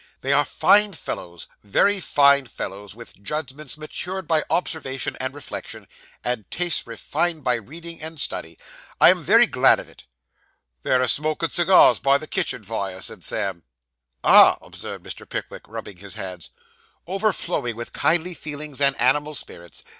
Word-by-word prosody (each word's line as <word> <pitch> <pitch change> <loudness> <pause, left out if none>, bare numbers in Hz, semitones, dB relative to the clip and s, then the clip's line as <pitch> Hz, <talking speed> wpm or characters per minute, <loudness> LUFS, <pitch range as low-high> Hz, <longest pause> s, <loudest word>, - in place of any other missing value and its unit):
'They 135 +1 +1
are 145 +1 +4
fine 210 +6 +3
fellows 90 - -7 0.2
very 195 - +2
fine 140 -5 +4
fellows; 100 -3 -7
with 115 -4 -13
judgments 150 +4 -5
matured 180 +4 -6
by 160 -1 +3
observation 135 -7 -2
and 130 +2 -2
reflection; 145 -3 -8 0.4
and 125 -4 -3
tastes 175 -1 -1
refined 155 +7 -2
by 125 - +2
reading 165 +9 -7
and 160 0 -6
study. 80 -10 -1 0.4
I - - +8
am - - -1
very - - +6
glad - - +4
of - - -9
it.' - - -17 0.8
'They're 130 - +2
a - - +1
smokin' 155 +2 0
cigars 175 +2 +5
by 140 0 +4
the 155 - -7
kitchen 170 - -1
fire,' 100 -3 -4
said 110 -6 -6
Sam. 95 -3 -2 0.6
'Ah!' - - +8
observed - - -8
Mr. - - -9
Pickwick, - - -6
rubbing 100 - -8
his 100 0 -10
hands, 90 -4 -6 0.6
'overflowing 190 - -1
with 120 +1 -7
kindly 175 +2 +1
feelings 150 -3 -6
and 140 -1 +3
animal 145 +5 +2
spirits. 85 - -7
140 Hz, 155 wpm, -23 LUFS, 115-160 Hz, 0.8 s, I